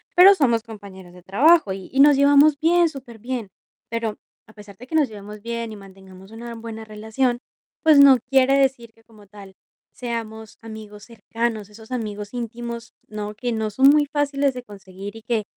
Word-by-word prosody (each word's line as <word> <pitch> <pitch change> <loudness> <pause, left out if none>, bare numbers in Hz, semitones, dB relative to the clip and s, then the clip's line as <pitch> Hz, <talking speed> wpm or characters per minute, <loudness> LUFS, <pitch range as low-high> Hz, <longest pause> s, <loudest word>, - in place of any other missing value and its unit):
pero 385 +3 +8
somos 235 -8 +1
compañeros 200 -5 -12
de 180 -1 -16
trabajo, 275 - +3
y 190 -1 -9
y 270 - -1
nos 290 0 +7
llevamos 285 +1 +5
bien, 340 +1 +4
superbien. 240 -4 -7 0.4
Pero, 230 -2 -3 0.3
a 220 - -18
pesar 205 -2 -14
de 250 +4 -13
que 320 - -5
nos 295 -6 +2
llevemos 210 0 -11
bien 235 0 -5
y - - -8
mantengamos 190 0 -15
una 235 +1 -9
buena 225 -1 -8
relación, 220 +4 -2 0.4
pues 310 -3 +6
no 275 -2 +8
quiere 270 0 +4
decir 265 -4 0
que, 225 - -27
como 215 -3 -20
tal, 200 -1 -13 0.4
seamos 225 -3 -7
amigos 215 -2 -11
cercanos, 230 -2 -4
esos 220 +3 -16
amigos 210 -4 -5
íntimos, 235 -1 -7 0.2
¿no? 210 0 -6
Que 245 +2 -3
no 220 -1 -2
son 265 +6 +5
muy 295 0 +4
fáciles 285 -2 0
de 250 -1 -8
conseguir 200 -1 -11
y 225 - -14
que 230 -3 -1
230 Hz, 180 wpm, -22 LUFS, 210-265 Hz, 0.4 s, pero